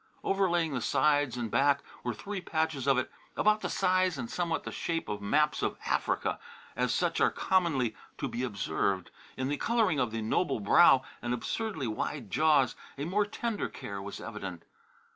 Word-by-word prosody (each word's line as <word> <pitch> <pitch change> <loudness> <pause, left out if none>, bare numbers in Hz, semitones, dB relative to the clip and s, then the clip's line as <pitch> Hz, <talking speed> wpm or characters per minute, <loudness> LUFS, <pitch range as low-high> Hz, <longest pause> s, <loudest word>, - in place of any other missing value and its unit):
Overlaying 175 -5 +1
the 125 - -1
sides 145 -1 +2
and 115 -3 -3
back 140 0 +3 0.2
were 120 -2 -2
three 200 - -5
patches 160 -5 -1
of 135 -2 +5
it 130 - -1 0.3
about 215 0 +3
the - - -2
size 185 -3 +2
and 120 -3 -5
somewhat 170 -2 -1
the - - -5
shape 165 -1 -2
of 105 -1 -4
maps 150 +9 +2
of - - -1
Africa - - 0 0.4
as - - +1
such - - 0
are - - +6
commonly 155 - +1 0.2
to - - -2
be 120 -1 -4
observed. 95 -5 -1 0.3
In 130 - -1
the 145 +1 -1
colouring 225 - +2
of 125 -3 +1
the 110 0 -3
noble 140 +5 +1
brow 130 +5 +6 0.2
and 120 +1 -1
absurdly 195 - -3
wide 115 0 -3
jaws 140 - +3 0.2
a 140 - -3
more 205 +5 +1
tender 225 0 -2
care 100 -1 -6
was 100 +1 -7
evident. 95 -6 -7
140 Hz, 180 wpm, -30 LUFS, 115-175 Hz, 0.4 s, are